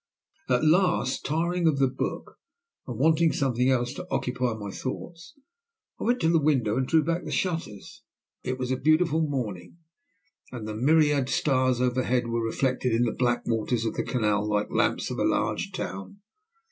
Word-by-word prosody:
At - - +2
last, 165 -5 +2
tiring 170 +3 0
of 155 -3 +2
the 135 -1 +3
book 130 +1 -5 0.5
and - - -5
wanting 160 0 +3
something 130 -2 +1
else 125 -1 +1
to 180 +5 -8
occupy 125 -2 -1
my 105 -2 -6
thoughts, 170 - -7 0.6
I - - -4
went 245 +2 +2
to 160 - +3
the 165 -1 +3
window 130 -8 +1
and 130 0 0
drew 160 +1 +3
back 165 +3 -1
the - - -6
shutters. 165 - -3 0.4
It 130 - -3
was 125 0 -3
a 130 - 0
beautiful 155 +3 +2
morning, 120 - -4 0.7
and 115 -4 -6
the 110 - -4
myriad 145 +2 +3
stars 130 -4 +1
overhead 125 0 +1
were 115 0 -1
reflected 125 +1 0
in 115 +2 +2
the 120 - +1
black 120 -1 0
waters 115 0 -1
of 110 - -1
the - - -2
canal 105 -4 0
like 105 0 0
the - - -11
lamps - - +1
of - - -4
a - - +1
large - - 0
town. 95 - -6
130 Hz, 180 wpm, -26 LUFS, 120-155 Hz, 0.7 s, the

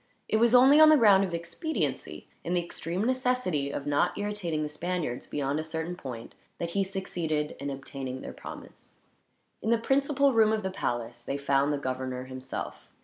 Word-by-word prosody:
It - - +2
was 235 +2 +4
only 265 +4 +8
on 310 0 +9
the 310 - +7
ground 205 -6 +6
of 190 - -2
expediency, 240 - -3 0.2
and 180 +1 0
the 175 - +1
extreme 175 +4 -3
necessity 250 - 0
of 140 0 -4
not 145 0 +1
irritating 205 -7 -2
the - - -1
Spaniards 160 -4 -3
beyond 145 +1 -1
a - - -2
certain 160 +2 -4
point, 125 -9 -8 0.2
that 170 0 -3
he 195 +2 +1
succeeded 170 -6 -2
in 140 - -3
obtaining 135 -1 -6
their - - -7
promise. - - -11 0.6
In 220 - -2
the 235 - +4
principal 275 +3 +2
room 220 -1 +5
of 215 -1 -1
the 190 - -2
palace 120 -7 -3
they 140 - -3
found 140 0 +2
the 145 - 0
governor, 130 -1 -3
himself. 130 0 -7
170 Hz, 185 wpm, -28 LUFS, 140-220 Hz, 0.6 s, on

